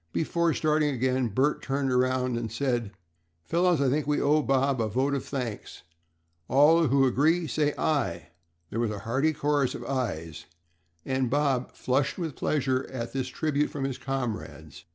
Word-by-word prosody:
Before 170 +1 +1
starting 150 -2 +1
again 130 0 +1
Bert 130 +8 +1
turned 135 -1 -1
around 125 0 +1
and 115 -2 -3
said, 120 -2 -1 0.5
"Fellows, 175 -1 +2
I 140 - +2
think 145 +3 0
we 150 - +1
owe 150 +2 +3
Bob 135 -2 +1
a 110 - 0
vote 130 +6 0
of 140 - -1
thanks. 125 -6 -5 0.6
All 150 +5 +5
who 135 +1 +4
agree 150 +7 +3
please 160 - -5
say 150 -1 +1
'Aye'." 120 - -1 0.4
There 115 - -2
was 120 -2 +1
a 105 - -4
hearty 135 +7 +1
chorus 145 -3 0
of - - -7
"Ayes," 95 - -3 0.6
and 130 -2 0
Bob 135 -2 0
flushed 135 +2 0
with 165 -6 -4
pleasure 135 -3 0
at 120 -3 -5
this 130 -1 -2
tribute 150 +2 -1
from 140 - -5
his 135 -2 -3
comrades. 125 - -5
135 Hz, 170 wpm, -27 LUFS, 125-150 Hz, 0.6 s, All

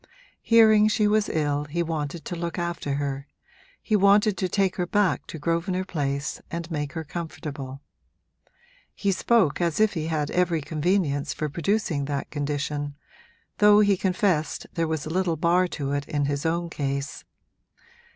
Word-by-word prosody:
Hearing 220 -2 +6
she 215 -1 +2
was 210 0 +2
ill 145 -2 0
he 170 +4 -1
wanted 155 -1 -4
to 175 - -4
look 170 +1 -4
after 170 -5 -2
her 140 0 -3 0.6
he 215 - +1
wanted 205 +1 +4
to 185 - -1
take 195 +1 +1
her 180 -1 -1
back 205 -1 +1
to - - -7
Grosvenor 170 +4 -1
Place 140 -4 -2
and 170 0 -5
make 145 -2 -3
her 160 - -4
comfortable: 145 -4 -6 1.1
he 200 - 0
spoke 195 -5 +2
as 170 0 0
if 215 -1 +4
he 160 -3 -3
had 155 -3 -1
every 175 -2 +1
convenience 155 -1 0
for 155 - -2
producing 165 -2 0
that 140 -1 -4
condition, 145 0 -3 0.6
though 210 0 +7
he 200 -1 +4
confessed 185 -4 0
there 165 -1 0
was 160 -2 -2
a 155 - -5
little 180 -3 +1
bar 175 +3 +3
to 140 -5 -4
it 145 0 -2
in 145 -1 0
his 145 +2 -1
own 170 +1 -1
case. 140 -1 -3
165 Hz, 160 wpm, -25 LUFS, 145-185 Hz, 1.1 s, though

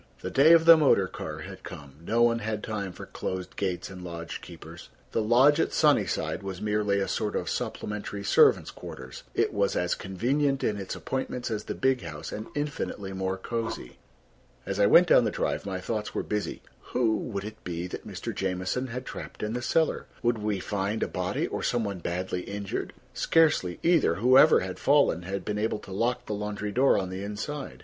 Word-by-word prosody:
The - - -4
day 140 +4 +6
of 165 -1 +6
the 165 0 +10
motor 135 -10 +4
car - - -6
had - - -9
come; 70 -1 -10
no 115 +6 +2
one 115 0 +3
had 105 -1 -3
time 100 -4 -3
for - - -9
closed 95 -1 -5
gates 95 -2 -2
and 90 -1 -9
lodge 85 -1 -6
keepers. - - -11 0.2
The - - +1
lodge 130 +7 +5
at - - +1
Sunnyside 100 - +2
was 95 -2 -6
merely 105 -1 +1
a 100 - 0
sort - - -2
of - - -2
supplementary 105 -1 -4
servants' - - +4
quarters: 65 0 -9
it - - +1
was 100 -1 +1
as 90 0 +1
convenient 135 +8 0
in 105 - 0
its 95 -2 -5
appointments 125 -2 -3
as 105 -1 -3
the - - -4
big 130 -1 +1
house 75 -3 -7
and 110 +1 -5
infinitely 145 -9 -3
more 95 0 -2
cozy. 115 - -4 0.7
As - - -3
I 100 - +5
went 175 - +7
down 125 - +6
the 110 - +1
drive, 100 - -2
my 95 -1 -3
thoughts 105 +3 -4
were - - -1
busy. 105 -1 -3 0.3
Who 110 -3 +2
would 100 -4 -4
it 105 +1 -9
be 85 0 -4
that 90 - -7
Mr. - - -5
Jamieson 95 +7 -2
had 125 +2 -6
trapped - - -7
in 105 +1 -2
the 125 - -2
cellar? 160 +5 +1 0.2
Would 120 -1 +2
we 105 -2 -1
find 100 +3 -2
a - - 0
body - - -2
or - - -4
some 120 -2 0
one 100 -3 -3
badly 90 +2 -3
injured? 100 +1 -4 0.2
Scarcely 150 - +2
either. 165 - +4
Whoever 130 - +6
had 95 0 -5
fallen 140 - +3
had 95 +2 -5
been 105 0 -2
able 110 0 0
to 100 - -12
lock 120 +5 -1
the 105 - -3
laundry 105 0 -3
door 130 +6 +4
on 95 -2 -2
the 95 +1 -5
inside. 105 +8 -5
105 Hz, 200 wpm, -27 LUFS, 95-125 Hz, 0.7 s, the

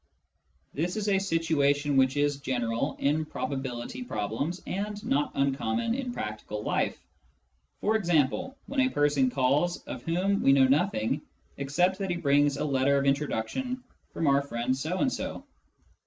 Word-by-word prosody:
This 175 +7 -2
is 210 -1 -2
a 195 -1 +3
situation 150 -6 +1
which 135 +1 +3
is 145 -1 +2
general 120 -4 -1
in 150 +3 +1
prob 155 - -4
ability 130 - -4
problems 140 - -3
and 205 +2 -3
not 145 +2 +1
uncommon 145 - 0
in 255 -1 -3
practical 105 - -5
life - - 0 0.4
— - - -41
e.g. 190 -7 +3 0.4
when 275 - -3
a 260 -1 +4
person 145 - +2
calls 140 +7 +1
of - - -7
whom 185 +4 0
we 135 - +5
know 135 -1 +6
nothing 140 - +1 0.4
except 175 +8 +1
that 195 -1 -2
he 175 - 0
brings 145 -3 +3
a 150 - -1
letter 140 0 +2
of 140 - +1
introduction 150 - -1 0.3
from 165 - -2
our 140 -1 +4
friend 125 -2 -1
so 155 +7 -2
and 260 +5 +1
so. - - -5
145 Hz, 155 wpm, -28 LUFS, 135-180 Hz, 0.4 s, know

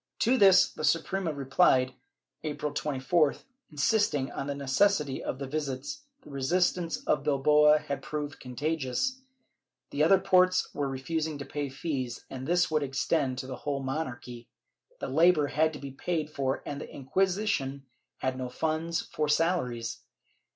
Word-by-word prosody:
To 245 +3 +4
this 195 -6 +7
the - - -7
Suprema 165 +3 +1
replied, 135 -2 +3 0.5
April 150 -1 -3
24th, 145 +2 +1 0.3
insisting 150 -2 +1
on 140 - -4
the 140 - -2
necessity 140 +1 +1
of - - -3
the 140 - -5
visits; 150 - -4 0.2
the 150 - -13
resistance 170 +5 0
of 150 - +2
Bilbao 150 +1 +5
had 145 -3 -4
proved 150 0 -5
contagious; 145 - -2 0.7
the 145 - +1
other 190 +5 +6
ports 185 -1 +3
were 140 -1 -2
refusing 155 +3 -3
to 140 - -7
pay 145 +1 -4
fees, 130 -3 -4
and 130 0 -6
this 175 -1 +2
would 155 -1 +2
extend 135 0 0
to 130 - -4
the 130 -1 -6
whole 140 +1 -3
monarchy; 125 -4 -5 0.5
the - - -4
labor 160 +2 +4
had 155 +2 +1
to - - -6
be 140 -1 -7
paid 155 +2 -3
for 135 -2 -2
and 145 0 -5
the - - -8
Inquisition 145 -3 -1 0.3
had 130 0 -2
no 125 -1 -3
funds 160 +4 -1
for 150 -1 -2
salaries. 130 -8 0
150 Hz, 150 wpm, -29 LUFS, 135-165 Hz, 0.7 s, this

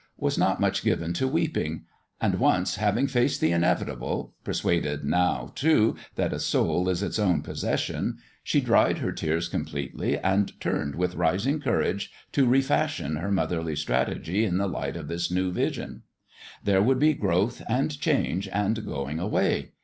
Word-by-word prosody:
was - - 0
not - - +2
much - - +1
given 85 +1 0
to 130 +9 0
weeping; 145 - -1 0.3
and - - +1
once - - +2
having 105 +5 +2
faced 130 0 +1
the 80 - +2
inevitable 85 0 -1
persuaded, 75 -4 -1
now, 80 -6 +1
too, 140 -7 +3 0.2
that - - 0
a - - -3
soul 90 +1 +1
is 90 +1 0
its 105 - -2
own 95 -4 +2
possession - - -2 0.3
she - - +2
dried - - +3
her - - -2
tears 80 +2 -1
com - - -2
pletely 70 -2 -3
and 95 +1 +1
turned 70 -1 -2
with 90 +1 -1
rising 100 - +1
courage 115 -6 0 0.2
to 135 -3 +3
re 130 +3 +5
fashion 80 - 0
her 90 +6 -3
motherly 85 -5 0
strategy 80 - 0
in 90 -5 +1
the 100 - +1
light 70 -4 -3
of 80 -3 -7
this 85 +2 -2
new 90 +1 0
vision. - - -3 0.6
There 95 -1 +3
would 130 +5 +3
be 155 +3 +4
growth 100 - 0
and 130 +6 +1
change 135 - +1
and 105 +2 0
going 70 0 -4
away. 95 +5 0
95 Hz, 165 wpm, -26 LUFS, 85-115 Hz, 0.6 s, re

